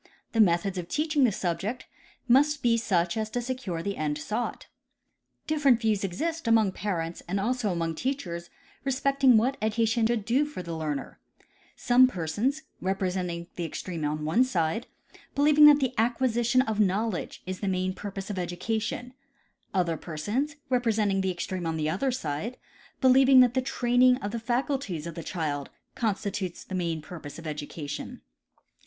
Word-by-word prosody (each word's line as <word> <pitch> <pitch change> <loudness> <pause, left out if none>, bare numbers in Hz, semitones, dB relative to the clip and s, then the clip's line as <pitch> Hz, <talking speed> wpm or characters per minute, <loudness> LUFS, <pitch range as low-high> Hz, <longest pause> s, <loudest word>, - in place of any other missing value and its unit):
The 225 - +3
methods 185 0 +2
of 175 - -6
teaching 300 - +2
tlie 225 - +2
subject 195 +7 -2 0.4
must 285 +4 +4
be 235 -1 +4
such 180 -7 +1
as 220 -1 -2
to 245 - -2
secure 240 -9 -4
the 200 +1 -3
end 150 -1 -1
sought. 215 +10 -3 0.8
Different 285 -6 +3
views 220 -4 +1
exist 320 - -3
among 220 -4 +4
parents 175 -4 -3
and 195 +3 -1
also 230 0 0
among 165 -2 -1
teachers 170 - -4 0.3
respecting 270 -2 +3
what 255 +5 +1
education 225 +1 +2
should 230 -3 -1
do 255 +6 +3
for 295 -11 -6
the 170 -1 -5
learner, 155 -3 -4 0.6
some 255 +1 +5
per 180 -10 -4
sons, 255 - -1 0.2
representing 185 -2 -2
the 175 - -2
extreme 165 0 -5
on 150 +1 -2
one 200 +11 +4
side, 205 -1 -1 0.5
believing 295 +1 +7
that 295 -1 +7
the 260 -2 0
acquisition 240 +1 +2
of 220 -3 -2
knowledge 205 0 0
is 185 0 -5
the 200 - -3
main 185 0 0
purpose 195 0 -6
of 195 - -5
educa, 180 +5 -2
tion; 245 +3 -5 0.6
other 175 -4 0
persons, 210 - -3 0.2
representing 220 -6 +2
the 190 - 0
extreme 180 0 -3
on 160 0 -1
the 155 0 0
other 260 +10 0
side, 215 - -3 0.4
be 260 - +5
lieving 265 +1 +7
that 245 -1 +4
the 260 - +1
training 250 0 +3
of 205 -5 -4
the 235 - -3
faculties 240 - -2
of 170 - -5
the 165 - -6
child 150 -4 -3 0.2
constitutes 200 -4 -2
the - - -10
main 170 -4 -2
purpose 155 -5 -9
of 170 - -10
education. 150 -1 -6
210 Hz, 165 wpm, -27 LUFS, 175-250 Hz, 0.8 s, believing